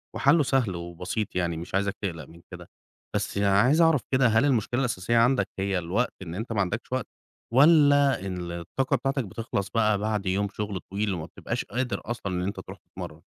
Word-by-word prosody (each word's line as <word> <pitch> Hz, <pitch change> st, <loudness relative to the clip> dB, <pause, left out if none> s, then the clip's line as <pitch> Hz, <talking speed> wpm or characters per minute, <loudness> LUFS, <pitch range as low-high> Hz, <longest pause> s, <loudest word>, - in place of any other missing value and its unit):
وحلّه 145 Hz, +3 st, +4 dB
سهل 125 Hz, -8 st, +1 dB
وبسيط، 85 Hz, +5 st, -4 dB
يعني 85 Hz, -2 st, 0 dB
مش 85 Hz, +3 st, -6 dB
عايزك 100 Hz, 0 st, 0 dB
تقلَق 85 Hz, -5 st, -4 dB
من 85 Hz, +1 st, -16 dB
كده. -, -, -10 dB, 0.5 s
بس -, -, -2 dB
عايز 100 Hz, +11 st, +4 dB
أعرف 160 Hz, -5 st, +4 dB
كده، 130 Hz, -1 st, +4 dB
هل 110 Hz, +5 st, +3 dB
المشكلة 120 Hz, -2 st, +1 dB
الأساسية 115 Hz, -3 st, 0 dB
عندك 125 Hz, +3 st, +3 dB
هي 95 Hz, -1 st, 0 dB
الوقت؟ 90 Hz, +9 st, -1 dB
إن 85 Hz, -2 st, -6 dB
أنت 110 Hz, +4 st, -5 dB
ما 100 Hz, -, +1 dB
عندكش 105 Hz, +7 st, -3 dB
وقت؟ 130 Hz, 0 st, -1 dB, 0.5 s
والّا 145 Hz, -, +5 dB
إن 90 Hz, -2 st, -4 dB
الطاقة 110 Hz, -, -1 dB
بتاعتك 135 Hz, +1 st, -1 dB
بتخلَص 100 Hz, 0 st, -4 dB
بقى 110 Hz, -2 st, +2 dB
بعد 105 Hz, 0 st, -2 dB
يوم 95 Hz, +2 st, +1 dB
شغل 105 Hz, -2 st, -4 dB
طويل 100 Hz, +3 st, -2 dB
وما 85 Hz, -3 st, -4 dB
بتبقاش -, -, -5 dB
قادر 125 Hz, +3 st, -2 dB
أصلًا 105 Hz, -5 st, -4 dB
إن 90 Hz, 0 st, -1 dB
أنت 100 Hz, -, -3 dB
ترُوح -, -, -9 dB
تتمرّن؟ -, -, -10 dB
105 Hz, 190 wpm, -26 LUFS, 95-125 Hz, 0.5 s, والّا